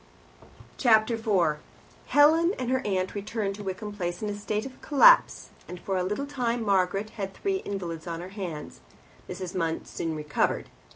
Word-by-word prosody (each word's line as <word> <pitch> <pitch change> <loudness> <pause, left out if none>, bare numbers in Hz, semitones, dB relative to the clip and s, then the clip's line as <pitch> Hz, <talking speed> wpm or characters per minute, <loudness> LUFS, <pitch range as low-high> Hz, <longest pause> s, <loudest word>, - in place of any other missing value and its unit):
Chapter 225 -1 +4
4 190 -9 +1 0.5
Helen 320 +5 +5
and 255 -1 -2
her 260 0 +1
aunt 185 -2 -1
returned 205 0 -3
to 205 +1 -8
Wickham 195 +2 -5
Place 175 -2 -4
in 210 - -1
a - - -2
state 210 +2 -3
of 260 -1 -10
collapse, - - +5 0.2
and 180 - -8
for 195 - -3
a 185 - +1
little 210 +9 -2
time 245 -4 -2
Margaret 195 +1 +1
had 195 -3 -5
three 390 -1 -1
invalids 180 - -5
on 165 -1 -4
her 180 +2 -7
hands. 180 -7 -7 0.5
Mrs. 180 -1 -5
Munt 165 -2 -1
soon 165 -1 -4
recovered. 150 -1 -1
200 Hz, 170 wpm, -27 LUFS, 180-230 Hz, 0.5 s, Helen